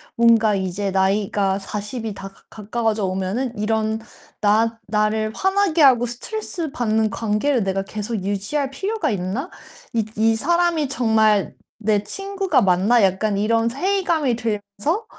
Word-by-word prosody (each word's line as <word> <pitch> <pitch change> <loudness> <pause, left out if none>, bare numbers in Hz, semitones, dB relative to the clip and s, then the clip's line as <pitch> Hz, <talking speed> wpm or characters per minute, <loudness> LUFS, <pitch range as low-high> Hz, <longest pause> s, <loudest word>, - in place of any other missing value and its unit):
뭔가 230 -3 +4
'이제 195 +1 -2
나이가 195 0 +1
40 210 +4 -5
이 215 - -3
다 195 0 -8
가 - - -23
가까워져 220 -1 -2
오면은 195 +7 -2
이런 220 +1 0 0.4
나 225 +2 +2
'나를 215 +1 0
화나게 385 -1 +1
하고 250 -4 +6
스트레스 330 - -4
받는 220 -5 +1
관계를 225 +4 0
내가 195 0 -1
계속 215 +3 -4
유지할 205 +9 -1
필요가 385 - -2
있나? 200 - -3 0.4
이 225 -2 +1
이 225 +1 +3
사람이 340 +2 +1
정말 220 -5 +2 0.2
내 210 -2 +1
친구가 390 -6 0
맞나?' 195 +4 +3
약간 195 +2 +1
이런 225 +2 +2
회의감이 325 -4 0
들면서 220 - -2
220 Hz, 285 characters per minute, -21 LUFS, 205-270 Hz, 0.4 s, 하고